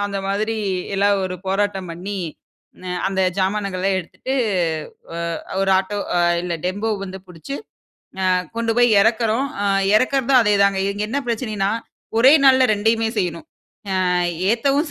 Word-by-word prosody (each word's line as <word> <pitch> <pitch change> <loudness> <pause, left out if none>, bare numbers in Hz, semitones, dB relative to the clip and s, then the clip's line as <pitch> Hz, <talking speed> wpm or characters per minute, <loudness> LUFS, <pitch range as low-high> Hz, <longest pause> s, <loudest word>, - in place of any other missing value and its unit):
அந்த 200 -1 -4
மாதிரி 210 +3 -1 0.4
எல்லாம் 200 0 +2
ஒரு 185 -1 -3
போராட்டம் 195 -1 -1
பண்ணி, 185 +5 -5 0.7
னெ-அந்த 185 +1 -2 0.2
ஜாமானங்கள்லாம் 195 -1 0
எடுத்துட்டு 255 +9 -5 0.8
அ - - -4 0.4
ஒரு 195 0 +1
ஆட்டோ 200 +2 -3 0.2
அ - - +3 0.2
இல்ல 175 -1 -2
டெம்போ 205 +5 -1
வந்து 190 0 -7
புடிச்சு, 180 - -8 0.8
அ - - +4 0.2
கொண்டு 230 -1 0
போயி 245 - +5
எறக்குறோம். 225 +3 +1 0.2
அ - - 0 0.3
எறக்குறதும், 260 +2 +3
அதேதாங்க. 200 -2 +3
இது 205 +1 -2
என்ன 280 +6 -1
பிரச்சனைன்னா, 215 -4 -1 0.5
ஒரே 260 +4 +7
நாள்ல 260 -1 +6
2யுமே 225 +2 +1
செய்யணும். 175 -4 -2 0.6
அ - - +1 0.4
ஏத்தவும் 280 +6 +1
205 Hz, 135 wpm, -21 LUFS, 190-230 Hz, 0.8 s, ஒரே